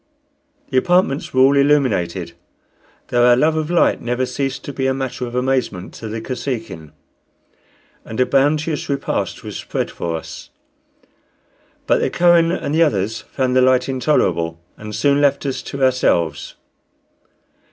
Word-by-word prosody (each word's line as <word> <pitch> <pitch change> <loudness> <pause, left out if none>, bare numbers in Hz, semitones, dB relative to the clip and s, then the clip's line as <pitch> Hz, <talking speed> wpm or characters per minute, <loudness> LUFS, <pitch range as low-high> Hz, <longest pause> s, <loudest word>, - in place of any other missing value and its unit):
The 130 - +1
apartments 175 -2 +1
were 130 - +2
all 135 +2 +5
illuminated, 100 - +1 0.8
though 120 0 +2
our 120 0 +6
love 155 +5 +2
of 155 0 -2
light 175 -1 +2
never 125 +2 -1
ceased 135 +1 -3
to 145 - -7
be 130 -1 -1
a 130 - 0
matter 130 -2 -4
of 120 - -8
amazement 125 -8 -1
to 115 - -8
the 110 +1 -4
Kosekin, 115 - -5 1.1
and 110 - -7
a 125 - +4
bounteous 150 +4 0
repast 140 -1 -2
was - - -7
spread - - -3
for 85 -1 -4
us. 80 - -10 1.4
But - - +2
the - - 0
Kohen 170 -1 +4
and 150 -5 -3
the 160 - +2
others 110 - +1
found 130 -2 0
the 130 - +5
light 130 0 +3
intolerable, 90 - 0 0.2
and 105 -1 -8
soon 140 0 +2
left 140 0 +2
us 135 -2 -2
to 140 -1 -5
ourselves. 85 - +1
130 Hz, 150 wpm, -19 LUFS, 115-140 Hz, 1.4 s, our